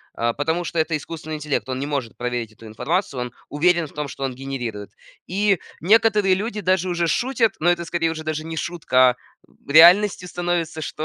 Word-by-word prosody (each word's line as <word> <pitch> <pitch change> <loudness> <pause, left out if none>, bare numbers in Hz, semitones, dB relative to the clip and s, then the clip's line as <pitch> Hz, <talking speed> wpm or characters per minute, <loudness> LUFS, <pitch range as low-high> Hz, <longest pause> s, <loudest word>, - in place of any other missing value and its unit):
А, 115 0 0
потому 160 +6 -1
что 170 - -2
это 160 0 +1
искусственный 155 +1 -7
интеллект, 150 -3 -3
он 130 0 -3
не 140 - -2
может 140 -6 -4
проверить 120 -2 -3
эту 110 +1 -16
информацию, 130 - -2
он 125 0 -4 0.2
уверен 170 +2 +2
в - - -18
том, 150 -1 -4
что 135 - -7
он 135 -1 -2
генерирует. 125 -6 -6 0.4
И 195 -1 +1 0.2
некоторые 210 +1 +4
люди 210 +2 -3
даже 185 -1 +1
уже 175 -1 0
шутят, 240 +2 +1
но 175 - +2
это 170 -1 -2
скорее 165 0 0
уже 160 -1 -5
даже 155 0 -3
не 160 0 -6
шутка, 130 -7 +2
а - - -9 0.6
реальностью 180 +4 +6
становится, 175 -2 -2
что, 155 0 -5
160 Hz, 195 wpm, -22 LUFS, 135-180 Hz, 0.6 s, реальностью